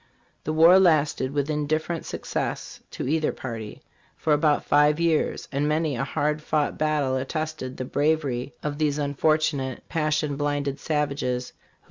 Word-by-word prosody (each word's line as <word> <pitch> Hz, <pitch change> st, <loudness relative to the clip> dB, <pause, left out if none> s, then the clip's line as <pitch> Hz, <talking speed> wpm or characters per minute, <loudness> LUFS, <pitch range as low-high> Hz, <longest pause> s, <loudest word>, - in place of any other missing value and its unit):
''The 155 Hz, -, -1 dB
war 170 Hz, +4 st, +7 dB
lasted, 155 Hz, -7 st, +3 dB
with 145 Hz, -1 st, -1 dB
indifferent 155 Hz, +2 st, -2 dB
success -, -, -4 dB
to -, -, -5 dB
either 155 Hz, +2 st, +1 dB
party, 115 Hz, -4 st, -7 dB, 0.3 s
for 155 Hz, -, +1 dB
about 150 Hz, 0 st, +2 dB
five 150 Hz, +1 st, +4 dB
years, 165 Hz, -2 st, +1 dB
and 145 Hz, +1 st, 0 dB
many 155 Hz, -1 st, 0 dB
a 120 Hz, -, -1 dB
hard 150 Hz, +3 st, -1 dB
fought 150 Hz, -1 st, 0 dB
battle 150 Hz, -4 st, 0 dB
attested 145 Hz, -1 st, -4 dB
the 130 Hz, -, -4 dB
bravery 145 Hz, -3 st, 0 dB
of 150 Hz, 0 st, -3 dB
these 150 Hz, -2 st, +1 dB
unfortu 155 Hz, +2 st, +1 dB
nate, 130 Hz, -2 st, -5 dB
passion 155 Hz, -2 st, 0 dB
blinded 145 Hz, -1 st, -1 dB
savages, 140 Hz, -5 st, -1 dB
who -, -, -36 dB
150 Hz, 150 wpm, -25 LUFS, 140-155 Hz, 0.3 s, war